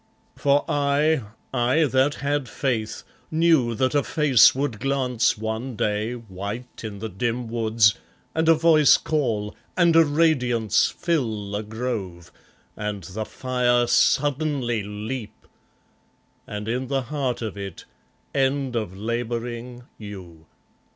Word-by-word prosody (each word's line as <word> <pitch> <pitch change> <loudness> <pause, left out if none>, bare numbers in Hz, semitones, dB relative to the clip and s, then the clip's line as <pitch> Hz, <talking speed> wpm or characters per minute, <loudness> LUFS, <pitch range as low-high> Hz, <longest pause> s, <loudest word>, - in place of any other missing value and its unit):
For 140 0 +2
I, 145 +1 +2 0.3
I 125 +6 +2
that 135 +1 +2
had 145 -2 -2
faith, 115 -6 -2 0.3
knew 155 -8 +3
that 130 +5 +1
a 145 - +3
face 140 -6 +5
would 135 -6 -2
glance 125 -4 +1
One 110 +4 -4
day, 105 +3 -1
white 110 +2 -7
in 105 -2 -6
the 110 +3 -5
dim 120 +4 -2
woods, 110 -2 +3 0.4
and 160 0 +1
a 165 - +7
voice 155 -3 +5
call, 115 -9 -1 0.2
and 170 -2 +4
a 165 - +8
radiance 125 -8 +2
Fill 115 - -2
the 105 +1 -2
grove, 105 -6 -5 0.4
and 105 -3 -4
the 100 +6 -5
fire 125 -1 +1
suddenly 135 -3 +1
leap... 105 +3 -6 1.0
and, 105 0 -6
in 125 +3 -2
the 135 0 -1
heart 130 -3 -2
of 110 - -4
it, 100 -3 -7 0.5
End 135 -1 0
of 105 -5 -3
labouring, 120 +2 -4 0.2
you! 90 -6 -10
120 Hz, 125 wpm, -24 LUFS, 110-140 Hz, 1.0 s, a